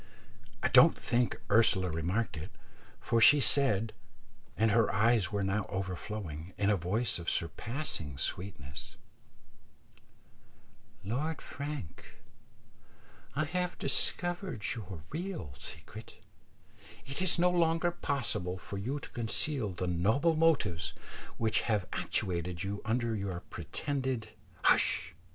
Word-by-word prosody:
I - - +3
don't 130 +6 +7
think 120 0 +1
Ursula 100 -5 +5
remarked 90 +5 -1
it, 75 +5 -6 0.5
for 115 0 +1
she 145 +6 +8
said, 115 -4 +3 0.6
and 110 0 +3
her 115 0 +4
eyes 110 -3 +3
were 100 -1 0
now 95 +1 0
overflowing, 95 -3 -5
in 100 0 +3
a - - +4
voice 100 +5 0
of 85 - -2
surpassing 85 - -2
sweetness, 75 -7 -5 2.1
"Lord 140 +10 -2
Frank, 140 - -7 1.2
I 155 +2 +1
have 180 +3 -2
discovered 175 - -1
your 100 -9 -7
real 160 - -4
secret; - - -10 0.9
it 135 +5 -4
is 185 -2 +2
no 180 +1 +4
longer 170 0 +2
possible 120 - -1
for 100 +1 -6
you 130 +9 -2
to 145 - -8
conceal 120 +1 0
the 90 0 -3
noble 110 - +2
motives 140 - +2 0.4
which 110 -1 +2
have 105 -4 +2
actuated 85 0 -1
you 100 +1 -3
under 115 +1 0
your 95 -4 -3
pretended 130 - -2 0.2
" 90 -2 -27
"Hush!" - - +3
110 Hz, 120 wpm, -32 LUFS, 95-140 Hz, 2.1 s, she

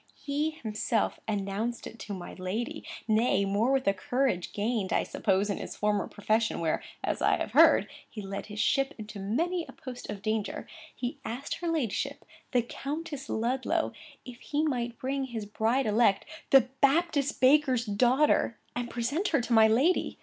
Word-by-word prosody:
He 295 +2 -1
himself 225 -6 -1
announced 210 +3 -2
it 230 - -9
to 210 - -6
my 180 -2 -8
lady; 190 +6 -4 0.2
nay, 220 -2 +3
more, 205 +6 +1
with 270 -1 +2
a 195 - +5
courage, 250 -4 -1
gained, 210 -2 -1
I - - +2
suppose, 195 0 0
in 200 - -1
his - - -6
former 210 -1 0
profession, 220 +2 0
where, 160 -2 0 0.2
as - - -1
I - - +4
have - - -3
heard, - - +6 0.2
he 215 - -7
had 195 - -8
led 200 - -4
his 210 0 -7
ship 275 +4 +2
into 215 -2 -8
many 330 - 0
a - - -10
post 255 -6 -9
of 200 -1 -6
danger, 215 -1 -2 0.3
he 250 +3 -4
asked 240 +5 -4
her 345 - -4
ladyship, 305 -11 -1 0.3
the 245 -2 +3
Countess 290 +3 -5
Ludlow, 245 +4 0 0.3
if 250 -2 -10
he 300 +1 -1
might 240 -6 -1
bring 270 +1 -2
his 230 -5 -5
bride 225 +5 +1
elect, 215 -2 +3 0.2
(the 270 - +8 0.2
Baptist 285 -1 +2
baker's 260 -3 +4
daughter!) 240 +3 +3 0.2
and 240 0 -3
present 280 - -1
her 285 -8 +2
to 240 0 -2
my 220 -1 +7
lady! 265 +12 +2
240 Hz, 175 wpm, -29 LUFS, 210-275 Hz, 0.3 s, the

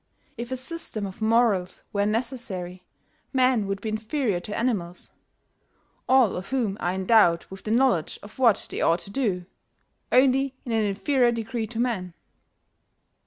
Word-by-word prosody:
If 235 +1 -6
a 260 - -1
system 260 -6 -2
of 190 +2 -9
morals 220 -5 +2
were 200 0 +1
necessary, 210 -6 -3 0.5
men 255 -5 +3
would 195 0 -3
be 220 - -3
inferior 220 -1 -1
to 205 +4 -5
animals, 195 -8 -2 1.0
all 260 -5 +5
of 185 +2 -6
whom 235 -7 0
are 175 - -1
endowed 190 -3 +4
with 190 0 -10
the - - -3
knowledge 230 -8 +2
of 210 +5 -13
what 235 -5 +4
they - - -3
ought 165 - +3
to 200 - -5
do, 200 -8 -1 0.7
only 265 +1 +3
in 240 - -4
an 220 -1 +2
inferior 240 +5 +2
degree 230 0 -3
to 230 0 -5
men." 190 -8 -2
220 Hz, 155 wpm, -25 LUFS, 190-250 Hz, 1.0 s, all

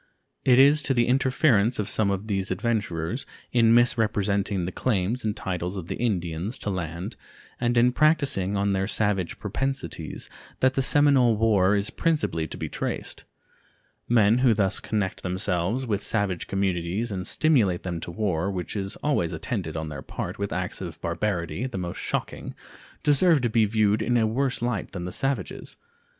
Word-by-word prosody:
It 125 -2 +5
is 140 +3 +6
to 135 - +1
the 120 -1 +3
interference 125 -3 +3
of 105 - -2
some 110 -2 +1
of 100 +1 -2
these 100 -2 -1
adventurers, 105 - -2 0.2
in 115 -2 +4
misrepresenting 105 -5 +2
the 90 - -3
claims 110 +2 -1
and 105 -1 -2
titles 90 0 -3
of 85 -3 -7
the - - -2
Indians 95 -2 -2
to 105 - -3
land 85 -1 -4 0.4
and 120 0 +1
in 120 +1 +5
practicing 135 - +2
on 100 0 +1
their 95 0 0
savage 100 -5 0
propensities, 130 - -4 0.3
that 130 0 +3
the 135 - +1
Seminole 135 -4 +4
war 105 -3 +3
is 100 +1 0
principally 150 - 0
to - - -8
be - - -3
traced. - - -4 0.8
Men 115 0 +4
who 125 -3 +4
thus 95 -3 +1
connect 105 -4 -2
themselves 95 +6 -1
with 105 -4 -1
savage 100 -5 -1
communities 95 +3 -1
and 90 -2 -3
stimulate 115 - +2
them 85 -3 -3
to 85 - -6
war, 90 -1 -1
which 90 -1 -4
is 95 -1 -2
always 135 - +1
attended 90 - -4
on 80 -1 -4
their 70 -3 -6
part - - -6
with 100 0 -2
acts 90 +1 -3
of 85 -4 -7
barbarity 85 +3 -2
the 125 - -6
most 90 -2 -4
shocking, - - -4 0.5
deserve 150 +1 +4
to 120 -2 0
be 110 -1 +4
viewed 105 0 +2
in 120 +2 +1
a 115 - +3
worse 125 +2 -1
light 120 -6 -2
than 90 -2 -4
the 90 - -4
savages. 135 -6 -3
105 Hz, 170 wpm, -25 LUFS, 90-120 Hz, 0.8 s, is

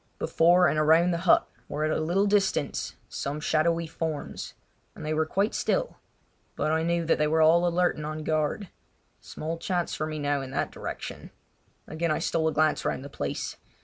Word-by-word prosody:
Before 175 +2 +4
and 155 - +1
around 160 +3 +4
the 170 - -1
hut - - +5 0.2
were 150 +1 -3
at 155 - +1
a - - -1
little 175 +6 +2
distance 200 -1 0
some 145 +2 -4
shadowy 165 +2 +1
forms; 160 -2 -5 0.4
they 155 +1 -3
were 155 0 +1
quite 200 +6 0
still, - - -1 0.6
but 155 - 0
I 160 0 +2
knew 170 0 0
that 165 - +2
they 150 - +3
were 160 +1 +3
all 170 +2 +5
alert 175 +1 +1
and 150 - -5
on 155 0 -5
guard. 155 +5 -1 0.5
Small 165 +2 -6
chance 175 0 -1
for 155 - -2
me 155 0 -4
now 145 -1 0
in 135 - -6
that 135 - -2
direction. - - -7 0.6
Again 165 +2 -2
I 155 - +1
stole 165 -1 0
a - - +2
glance 155 0 +2
round 135 - -2
the - - -8
place. 70 - -4
160 Hz, 190 wpm, -27 LUFS, 155-170 Hz, 0.6 s, hut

